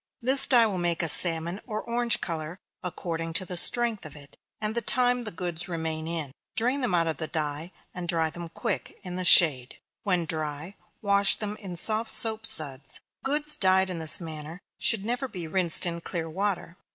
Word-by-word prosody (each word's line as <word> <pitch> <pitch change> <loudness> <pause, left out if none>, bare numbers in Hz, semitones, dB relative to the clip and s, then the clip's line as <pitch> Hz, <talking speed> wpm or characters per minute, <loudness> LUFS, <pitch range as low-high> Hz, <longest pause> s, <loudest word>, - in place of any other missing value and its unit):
This 265 +2 +7
dye 240 -3 +5
will 200 -4 -3
make 175 -1 -1
a - - 0
salmon 170 +3 +2
or 215 0 -5
orange 235 0 0
color, 165 0 -5 0.3
according 165 -2 -6
to 185 +3 -2
the 180 - -6
strength 230 +4 +6
of 155 -2 -9
it, 145 -1 -15 0.2
and 215 0 -3
the 235 - -2
time 245 0 0
the - - -3
goods 175 0 -5
remain 160 -2 -5
in. 160 -5 -3 0.2
Drain 250 +5 -1
them 240 -8 -1
out 165 -1 +1
of 160 -3 -3
the 160 - -5
dye, 155 +2 -4 0.2
and 180 -1 -7
dry 165 -2 0
them 170 0 -9
quick, 220 +3 -5
in 180 -1 -8
the 185 - -4
shade 145 -8 +4 0.2
when 180 -6 -1
dry, 155 +3 -6 0.3
wash 200 -1 +4
them 210 -1 -5
in 190 -4 -9
soft 220 +5 -2
soap 220 0 +3
suds. 140 -7 0 0.2
Goods 300 +2 0
dyed 190 0 +1
in 175 - -5
this 160 -1 +4
manner 160 0 -9 0.2
should 215 -3 0
never 245 +4 -3
be 180 -8 -7
rinsed 175 0 +4
in 170 -1 -5
clear 165 -1 -6
water. 180 0 -4
180 Hz, 195 wpm, -25 LUFS, 160-215 Hz, 0.3 s, This